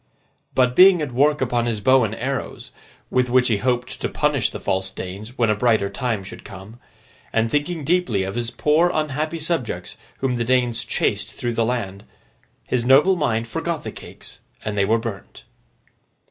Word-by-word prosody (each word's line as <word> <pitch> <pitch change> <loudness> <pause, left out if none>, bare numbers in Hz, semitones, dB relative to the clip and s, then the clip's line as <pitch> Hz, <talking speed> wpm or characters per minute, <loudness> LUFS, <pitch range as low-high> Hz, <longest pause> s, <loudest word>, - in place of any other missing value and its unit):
But, 125 -1 +3
being 185 +1 +8
at 150 -4 -3
work 145 +4 +2
upon 120 -2 0
his 115 -3 -1
bow 130 +3 +4
and 110 0 -2
arrows, 130 +2 -4 0.4
with 125 -1 +2
which 125 0 +3
he 110 - +2
hoped 125 +2 -2
to - - -1
punish - - +1
the - - -7
false 95 0 -1
Danes 100 +8 -8
when 115 -3 +3
a - - +1
brighter 110 -3 +2
time 115 -4 -2
should 95 - -10
come, 100 +5 -11 0.5
and 115 0 +1
thinking 150 +2 -1
deeply 155 - +1
of 95 +1 -4
his 120 -1 -2
poor 155 +7 +2
unhappy 155 +1 -2
subjects 160 -6 -3 0.2
whom 130 -2 -1
the 120 - 0
Danes 120 -1 +1
chased 105 0 -1
through 120 -1 -3
the 115 - +1
land, 100 -5 -3 0.6
his 125 -2 -1
noble 140 +10 +5
mind 115 -8 0
forgot 165 +2 -3
the - - -5
cakes, - - -12 0.3
and 105 - -2
they 100 -1 +2
were 110 +3 +3
burnt. 115 -4 -7
120 Hz, 180 wpm, -22 LUFS, 110-140 Hz, 0.6 s, being